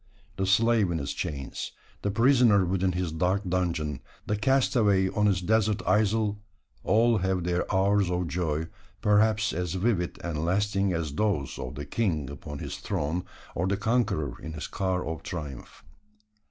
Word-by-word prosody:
The 95 0 -1
slave 110 0 +3
in 85 - -1
his 70 -3 -3
chains, 70 -2 -5 0.3
the 100 - -1
prisoner 115 -3 +4
within 95 +1 0
his 90 -2 -2
dark 90 +5 0
dungeon, 85 -6 -1 0.3
the 105 - 0
castaway 105 -5 +3
on 105 +2 +1
his 95 -3 +2
desert 110 +2 +1
isle, 105 0 +2 0.4
all 115 +2 +3
have 95 -1 0
their 90 0 -1
hours 100 0 +3
of 90 -1 -1
joy 80 -1 -1 0.4
perhaps 105 0 +3
as 90 0 -2
vivid 95 -3 0
and 80 -3 -2
lasting 100 +2 +1
as 80 -4 -2
those 90 -7 -1
of 65 +2 -5
the 70 - -5
king 80 - -1
upon 70 +1 -7
his - - -5
throne, 80 +5 -2 0.3
or 90 +3 -1
the 100 +1 0
conqueror 105 - 0
in 80 - -6
his 75 - -5
car 95 -2 -1
of 80 0 -4
triumph. 75 -7 -7
95 Hz, 160 wpm, -27 LUFS, 80-105 Hz, 0.4 s, prisoner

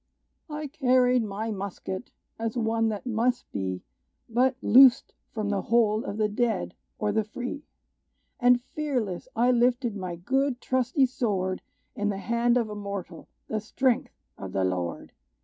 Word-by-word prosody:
"I 300 0 -4
carried 255 -3 +3
my 215 +1 -3
musket, 195 +1 -5 0.3
as 225 +1 -2
one 225 -1 +1
that 215 +4 -4
must 245 +1 0
be 95 -2 -3 0.4
But 250 +3 +2
loosed 260 +2 +7 0.2
from 215 -2 -2
the 200 -2 0
hold 225 +1 +2
of 205 - -4
the 215 -1 +2
dead, 220 -1 -1 0.2
or 210 -1 0
the 220 +1 +1
free! 250 +7 -6 0.7
And 245 -1 +5
fearless 250 - -3
I 240 +2 +4
lifted 245 -1 +2
my 185 -3 -4
good, 265 +8 0
trusty 260 +2 +2
sword, 195 -7 -1 0.3
In 205 0 0
the 200 - -2
hand 235 +3 +1
of 235 -3 +1
a 210 - -6
mortal, 200 -5 -6 0.2
the 215 - -1
strength 250 +4 0 0.2
of 95 -1 -7
the 95 - +1
Lord! 90 -2 -2
230 Hz, 150 wpm, -27 LUFS, 205-250 Hz, 0.7 s, loosed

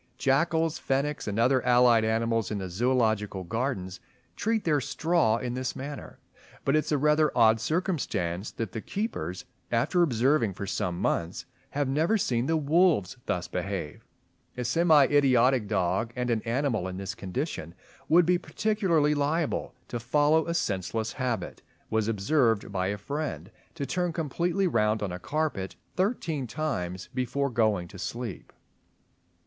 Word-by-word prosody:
Jackals, 160 +4 +1
fennecs, 140 +1 -1
and 105 0 -2
other 125 +3 +3
allied 120 -2 +5
animals 115 -1 0
in 105 - -2
the 95 -2 -5
Zoological 110 -3 +1
Gardens, 95 -2 -3 0.4
treat 220 0 0
their 150 -4 +2
straw 140 -2 +1
in 120 0 -3
this 130 0 -3
manner; 140 +2 -7 0.5
but 135 - +3
it - - +5
is - - -5
a 150 - +3
rather 150 +2 +3
odd 110 -1 +5
circumstance 110 - -1
that 115 -5 -5
the 110 - -5
keepers, 95 - -4 0.3
after 125 +10 +2
observing 125 - +2
for 100 - -5
some 90 -2 -2
months, 85 0 -1 0.2
have 145 -1 -1
never 160 +11 +2
seen 125 - 0
the 160 - +2
wolves 155 - +2
thus 90 0 -1
behave. 90 -4 -4 0.5
A 125 - -2
semi 155 +3 +5
idiotic 130 -5 +3
dog—and 115 +6 -1
an 110 -2 +1
animal 115 -5 0
in 90 0 -5
this 95 0 -4
condition 95 - -4 0.3
would 170 +2 +6
be 180 +1 +3
particularly 185 -9 +1
liable 150 -2 -1
to 120 - -3
follow 150 +7 +2
a 170 - -1
senseless 105 - -1
habit—was 115 -3 -3
observed 115 0 +1
by 95 -1 -1
a 100 +1 -2
friend 110 - -4 0.2
to 145 -4 -3
turn 180 +3 -1
completely 170 +4 0
round 110 - +1
on 100 - -2
a 90 - -5
carpet 130 - -2 0.2
thirteen 170 - -1
times 95 - -3
before 130 +2 -1
going 110 -6 +1
to 95 - -12
sleep. 115 +1 -5
125 Hz, 150 wpm, -28 LUFS, 105-150 Hz, 0.5 s, would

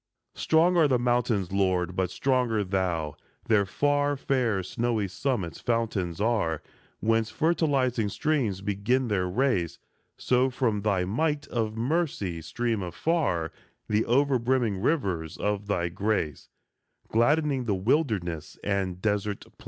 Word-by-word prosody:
Strong 170 +3 +3
are 160 -3 +5
the 130 -3 +3
mountains, 120 -6 +1
Lord, 95 -2 +1
but 95 -1 0
stronger 125 -3 +1
thou! 90 -6 -1 0.3
Their 105 -3 +3
far, 145 +5 +1
fair 125 -8 0
snowy 115 +2 -1
summits 100 - -2
fountains 110 -8 -1
are, 100 -9 0 0.4
Whence 115 0 +2
fertilizing 130 -5 +1
streams 125 -8 0
begin 105 +6 0
their 95 -3 +1
race; 90 - 0 0.4
So, 130 +1 +2
from 115 -5 0
thy 100 -3 +1
might 145 - -1
of 110 -2 -2
mercy 120 - -1
stream 115 +6 -2
afar 90 - -1 0.4
The 105 +1 +2
over 135 +1 +3
brimming 115 -5 0
rivers 95 - -1
of 105 0 -2
thy 90 -4 0
grace, 95 -6 -2 0.6
Gladdening 135 +3 +2
the 105 -4 +1
wilderness 95 - -1
and 95 -3 -1
desert 105 0 -1
place. - - -17
110 Hz, 130 wpm, -27 LUFS, 95-130 Hz, 0.6 s, are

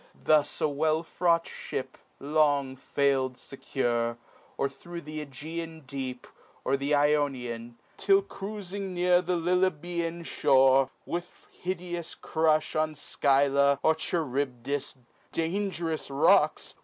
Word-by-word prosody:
Thus 155 -2 +3
a 155 - +2
well 155 +2 +1
fraught 170 0 +1
fhip - - -5 0.3
Long 145 -2 +2
fail'd 135 -1 0
fecure, 120 -3 -2 0.4
or 140 - +1
thro' 170 +5 -9
th' 170 - -14
^Egean 155 +2 -6
deep, 130 -2 -5 0.4
Or 135 - +2
the 140 +2 +1
Ionian, 130 -6 0 0.2
till 195 0 +4
cruifmg 200 -1 -6
near 180 -2 +2
The 180 0 0
Lilybean 170 -1 0
(liore, 135 -4 +4 0.2
with 175 +1 -6
hideous 175 -2 -5
crufli 155 -1 +1
On 155 0 -2
Scvlla, 140 0 +3
or 160 - +5
Charibdis 140 -5 -2 0.4
(dang'rous 165 -2 -2
rocks 135 0 +3
155 Hz, 110 wpm, -28 LUFS, 135-170 Hz, 0.4 s, or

